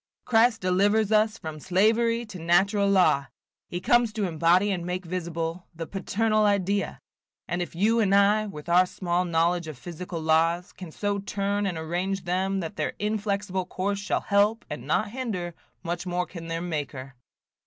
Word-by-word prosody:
Christ 230 -1 +3
delivers 200 +4 +2
us 215 0 +3
from 155 -1 -7
slavery 230 +7 +2
to 205 -5 -9
natural 195 +5 +3
law; 180 -8 +3 0.4
he 175 - -4
comes 240 +3 +3
to 215 -2 -2
embody 175 +4 +3
and 180 -3 -2
make 180 +1 -4
visible 170 0 -4
the 165 0 -5
paternal 215 +4 0
idea; 200 -1 +1 0.5
and 175 +1 -2
if 175 - -5
you 220 +6 +3
and 200 -3 +3
I, 205 +2 +4
with 150 -6 -9
our 180 +2 +5
small 180 0 -1
knowledge 170 0 +1
of 155 -4 -7
physical 175 +4 -6
laws, 165 +4 +1
can 180 -4 -9
so 205 +3 -2
turn 200 0 -1
and 180 -4 -3
arrange 180 +4 -2
them 190 +2 0
that 165 - -6
their - - -1
inflexible 205 -3 -2
course 200 +2 -2
shall 200 - -1
help, 205 +3 +2
and - - -6
not 215 -1 +1
hinder, 210 -9 -4 0.3
much 175 +1 -4
more 180 0 -1
can 165 -2 -9
their 165 0 -3
Maker." 145 -5 -4
185 Hz, 170 wpm, -26 LUFS, 170-205 Hz, 0.5 s, our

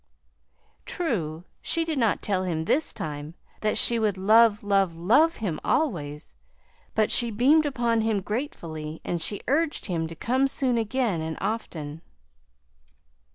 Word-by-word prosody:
True, 175 - -2 0.2
she 330 0 0
did 315 -4 -2
not 225 -4 +1
tell 195 -3 0
him 160 -3 -2
this 305 - +1
time 150 +1 -6 0.2
that 215 0 0
she 235 -1 +4
would 210 -3 +1
love, 215 +2 +5
love, 195 -4 +1
love 280 - +4
him 180 -8 -3
always; 150 - -1 0.6
but 215 -1 +2
she 240 -1 +2
beamed 280 +8 +4
upon 235 -4 +1
him 220 -2 0
gratefully 165 - -5
and 170 -1 -2
she 200 +5 -2
urged 305 +3 0
him 165 -5 -2
to 165 - -9
come 260 - +1
soon 255 -3 0
again, 225 -5 0
and 160 0 -4
often. 160 -9 -4
210 Hz, 145 wpm, -26 LUFS, 165-250 Hz, 0.6 s, love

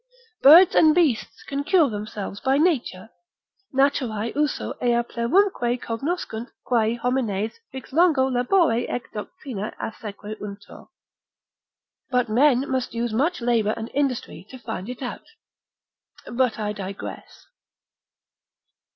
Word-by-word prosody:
Birds 330 +6 +8
and 310 -1 +5
beasts 305 -11 +1
can 280 0 -3
cure 350 -1 +4
themselves 210 -2 -6
by 270 +1 +1
nature, 255 - 0 0.6
naturae 255 -5 0
usu 295 -1 -1
ea 240 -1 +2
plerumque 245 0 +1
cognoscunt 235 -1 -4 0.2
quae 230 -2 +1
homines 230 - -2
vix 265 -1 -9
longo 315 -4 +4
labore 250 0 +2
et 245 - -3
doctrina 215 0 -6
assequuntur, 210 -2 -8 1.2
but 250 -3 +1
men 260 +3 +3
must 260 -3 -2
use 235 -1 -2
much 290 +7 0
labour 230 -3 +1
and 225 +1 -6
industry 275 -4 -2
to 260 - -10
find 225 -3 -6
it 250 +1 -6
out. 250 - -6 1.0
But 250 -1 0
I 210 -1 -2
digress. 195 -1 -8
245 Hz, 115 wpm, -24 LUFS, 220-275 Hz, 1.2 s, Birds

